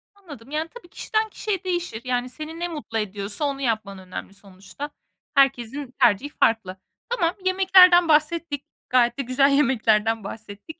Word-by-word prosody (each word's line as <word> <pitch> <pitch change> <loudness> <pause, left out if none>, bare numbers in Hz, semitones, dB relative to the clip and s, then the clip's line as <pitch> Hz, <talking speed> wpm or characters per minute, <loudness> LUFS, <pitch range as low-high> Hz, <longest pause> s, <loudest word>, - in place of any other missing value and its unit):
Anladım, 290 - -13
yani, 315 +2 -2
tabii, 480 -7 -12
kişiden 435 +3 -2
kişiye 400 -3 -3
değişir. 350 -11 -3
Yani, 250 0 -1
seni 310 +4 -8
ne 350 - -2
mutlu 295 -9 -5
ediyorsa 205 +5 -3
onu 275 -1 -3
yapman 215 -5 -2
önemli 185 +1 -8
sonuçta. 200 +9 -10 0.5
Herkesin 270 0 +1
tercihi 245 +3 +3
farklı. 220 -9 0 0.3
Tamam, 360 -8 0
yemeklerden 370 -2 +6
bahsettik, 310 -1 +1 0.2
gayet 240 0 +3
de - - -1
güzel 270 +2 +2
yemeklerden 225 -5 +2
bahsettik. 215 +10 -10
275 Hz, 145 wpm, -23 LUFS, 225-335 Hz, 0.5 s, yemeklerden